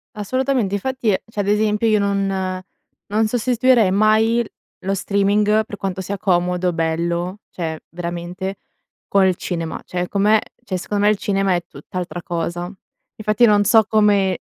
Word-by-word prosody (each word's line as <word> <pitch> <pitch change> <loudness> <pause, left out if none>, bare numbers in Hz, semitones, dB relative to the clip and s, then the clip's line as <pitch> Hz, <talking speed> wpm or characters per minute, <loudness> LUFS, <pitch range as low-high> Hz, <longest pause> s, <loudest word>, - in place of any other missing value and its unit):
Assolutamente. 250 0 0
Infatti, 260 +3 -1 0.2
cioè, 220 - -7
ad 200 - 0
esempio, 210 +1 +2
io 215 -1 +3
non 195 -2 -1 0.5
non 220 +1 +2
sostituirei 245 -2 +3
mai 220 +3 +3 0.4
lo 195 +1 0
streaming 205 +2 +2
per 210 - -7
quanto 190 -2 -4
sia 195 +2 -4
comodo, 180 -1 +1
bello, 170 +3 -1
cioè 160 -3 -4
veramente, 175 +3 -5 0.5
col 190 -2 +3
cinema, 165 -3 -4
cioè 180 0 -3
come 210 +3 +3 0.2
cioè, 185 -2 -3
secondo 205 +3 -2
me, - - +6
il 210 - 0
cinema 195 -1 +1
è 175 - -2
tutt'altra 175 +5 -6
cosa. 170 +1 -3 0.5
Infatti, 215 +2 +2
non 205 -2 +4
so 220 +2 +5
come 205 -4 +2
200 Hz, 145 wpm, -20 LUFS, 180-215 Hz, 0.5 s, me